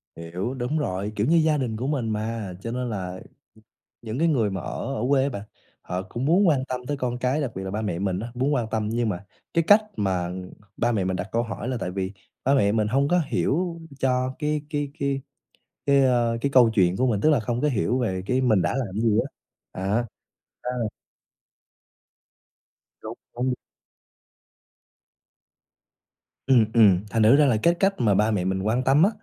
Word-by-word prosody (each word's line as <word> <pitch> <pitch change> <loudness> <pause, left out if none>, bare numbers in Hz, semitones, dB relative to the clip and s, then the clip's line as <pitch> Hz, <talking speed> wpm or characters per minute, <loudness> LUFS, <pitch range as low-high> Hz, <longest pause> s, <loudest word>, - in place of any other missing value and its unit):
Hiểu, 90 +8 -4
đúng 130 +4 -2
rồi, 100 -5 -2
kiểu 105 +2 0
như 165 - +4
gia 155 -2 +3
đình 120 -5 -2
của 130 +4 -3
mình 130 -7 -1
mà, 110 -2 -3
cho 115 - -4
nên 125 0 -3
là, 95 -4 -4 0.8
ừm, 115 +2 -5
cái 170 - +3
người 120 -10 +2
mà 95 -2 -4
ở 135 +9 -4
ở 110 - -2
quê 135 -2 +4
á 140 - +1
bạn, 100 -7 -5 0.4
họ 90 +1 -3
cũng 120 +6 -5
muốn 180 +5 +4
quan 135 -4 +2
tâm 130 -1 -4
tới 145 - -2
con 125 -2 -2
cái, 130 +4 0
đặc 140 -5 -2
biệt 95 - -5
là 95 - -4
ba 105 +2 -3
mẹ 90 -5 -2
mình 95 -1 -1
á, 115 - -5
muốn 135 +4 +1
quan 120 -5 0
tâm. 110 -1 -1
Nhưng 115 0 0
mà 100 0 -4 0.3
cái 165 - +3
cách 210 +1 +7
mà 95 -4 -1 0.5
ba 120 +1 +1
mẹ 100 -5 0
mình 95 0 -1
đặt 90 +2 -4
câu 115 - +1
hỏi 115 +1 -5
là 130 - -1
tại 90 - -3
vì 95 +1 -3 0.3
ba 135 - +3
mẹ 100 -6 +3
mình 110 -1 +1
hông 140 +5 +2
có 180 0 +3
hiểu 170 +4 -1 0.2
cho 130 0 0
cái 150 -1 -1
cái 145 -2 -2
cái 140 -1 -1 0.7
cái, 140 -1 +5
ơ, 120 -2 +2
cái 140 - 0
câu 125 -4 +6
chuyện 90 -2 +3
của 130 - +2
mình, 105 -5 +1
tức 155 - +4
là 145 - +3
hông 120 0 -1
có 150 - +2
hiểu 125 0 0
về 95 -7 -1
cái 125 +4 +1
mình 110 -8 +3
đã - - 0
làm 130 -5 -1
cái 110 - -2
gì 105 - +2
á, - - 0 0.5
á, 110 +5 0 0.6
à 125 - -3 2.3
Đúng, - - -6 0.2
đúng. 125 +1 -1 2.9
Ừm, 125 -5 +5
ừm, 100 -6 +6
thành 110 0 +2
thử 115 +6 +7
ra 150 0 +5
là 120 -5 +3
cái 170 - +5
cách 195 +3 +2
mà 110 -4 +3
ba 105 +3 +3
mẹ 95 -4 0
mình 95 0 -1
quan 115 +5 0
tâm 135 +5 +4
á, 200 - +5
120 Hz, 210 wpm, -25 LUFS, 105-135 Hz, 2.9 s, cách